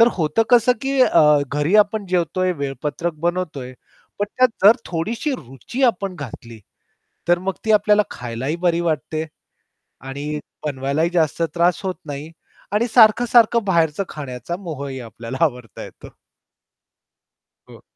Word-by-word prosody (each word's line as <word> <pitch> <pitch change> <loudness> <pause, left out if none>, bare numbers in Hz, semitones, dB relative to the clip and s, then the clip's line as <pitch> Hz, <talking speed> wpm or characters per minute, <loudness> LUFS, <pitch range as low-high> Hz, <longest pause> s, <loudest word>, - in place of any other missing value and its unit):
तर 230 - +7
होतं 170 +6 +1
कसं 245 0 +5
की 270 0 0
अ, 150 -9 +5
घरी 145 +7 -1
आपण 205 0 -6
जेवतोय 185 +1 0
वेळपत्रक 145 +5 -3
बनवतोय. 155 -8 -3 0.5
पण 205 - 0
त्यात 255 0 +5 0.2
जर 215 +4 +8
थोडीशी 220 - -2
रुची 135 - -7
आपण 195 -6 0
घातली 115 -5 -9 0.7
तर 175 0 +3
मग 190 +1 -2
ती 220 - +2
आपल्याला 210 0 +4
खायला 120 0 -6
ही 155 - 0
बरी 170 -1 +1
वाटते. 155 -1 -2 0.8
आणि 140 +3 -5 0.3
बनवायलाही 140 +3 -1
जास्त 165 -2 +1
त्रास 175 0 +2
होत 185 -1 -2
नाही 145 +1 -7 0.4
आणि 215 +4 +1
सारखं-सारखं 235 0 +5
बाहेरच 165 -5 +1
खाण्याचा 135 +2 -6
मोह 160 -7 -6
ही 135 -1 -6
आपल्याला 115 +2 -8
आवरता 125 -7 -6
येतो. - - -12 1.6
हो. - - -15
170 Hz, 135 wpm, -21 LUFS, 140-205 Hz, 1.6 s, जर